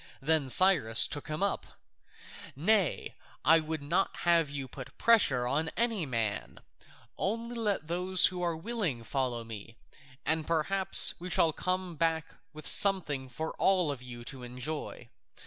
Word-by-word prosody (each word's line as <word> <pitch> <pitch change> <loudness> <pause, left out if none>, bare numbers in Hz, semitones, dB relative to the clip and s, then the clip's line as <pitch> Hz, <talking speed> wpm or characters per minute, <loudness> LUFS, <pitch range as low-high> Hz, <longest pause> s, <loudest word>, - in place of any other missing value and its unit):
Then 150 -1 0
Cyrus 145 -10 +5
took 145 - -4
him 155 +5 -3
up: 200 - -3 0.8
"Nay, 185 +4 0 0.3
I 160 +1 +6
would 155 -1 -5
not 175 +7 -1
have 170 -3 +3
you 140 -2 -5
put 130 0 -11
pressure 145 - +3
on 155 +5 -1
any 225 -8 0
man; 110 -4 -3 0.6
only 230 +4 -3
let 210 -7 -2
those 180 +2 +2
who 180 -1 +2
are 170 -2 -2
willing 175 - -3
follow 125 -1 -3
me, 115 0 -10 0.5
and 160 0 0
perhaps 185 +4 +5
we 180 +2 -7
shall 165 -2 +2
come 185 -1 -3
back 165 0 -1 0.2
with 155 0 -12
something 155 -10 +3
for 160 +6 -5
all 185 -5 +2
of 135 -3 -7
you 120 -1 -10
to 130 0 -7
enjoy. 125 +5 -6
160 Hz, 145 wpm, -29 LUFS, 135-185 Hz, 0.8 s, I